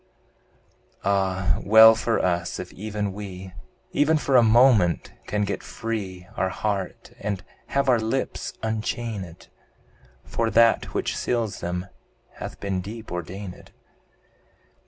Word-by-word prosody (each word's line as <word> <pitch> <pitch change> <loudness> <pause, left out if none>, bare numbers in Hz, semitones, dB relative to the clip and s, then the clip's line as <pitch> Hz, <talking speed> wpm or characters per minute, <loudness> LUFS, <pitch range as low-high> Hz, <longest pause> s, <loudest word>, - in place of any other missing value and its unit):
Ah! 95 -4 +1
well 110 +2 +9
for 115 +1 0
us, 85 -1 0
if 90 - -7
even 105 0 -3
we, 95 -2 -8 0.4
Even 155 +2 +3
for 140 -3 0
a 125 - +8
moment, 115 -6 +4
can 105 0 0
get 100 -1 -2
free 95 -6 -5
Our 95 - 0
heart, 100 0 -3
and 100 -2 -3 0.2
have 140 0 0
our 125 -3 +5
lips 110 +4 -2
unchained; 110 -5 -4 0.7
For 115 -1 -1
that 115 0 +3
which - - -1
seals 115 -4 -1
them 90 +1 -3 0.5
hath - - -7
been 95 -2 -2
deep 110 +4 -8
ordained! 90 +2 -7
105 Hz, 120 wpm, -25 LUFS, 95-115 Hz, 0.7 s, well